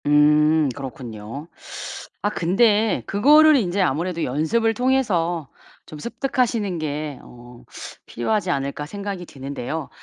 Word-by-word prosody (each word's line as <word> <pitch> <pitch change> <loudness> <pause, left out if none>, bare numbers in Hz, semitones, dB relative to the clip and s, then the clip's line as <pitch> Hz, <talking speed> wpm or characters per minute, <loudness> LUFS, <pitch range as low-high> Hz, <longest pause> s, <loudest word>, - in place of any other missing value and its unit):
음 150 +1 +4
그렇군요. 125 0 -7 0.8
아 205 - +2
근데 210 +3 +2
그거를 300 +9 +6
인제 200 -6 +1
아무래도 170 +1 0
'연습을 160 - +1
통해서 200 - 0 0.4
좀 155 - -10
습득하시는 235 - -1
게 150 -2 -4
어 120 0 -14 0.4
필요하지 185 - -1
않을까?' 140 0 -2
생각이 200 0 -5
드는데요. 140 +2 -5
165 Hz, 270 characters per minute, -22 LUFS, 145-210 Hz, 0.8 s, 그거를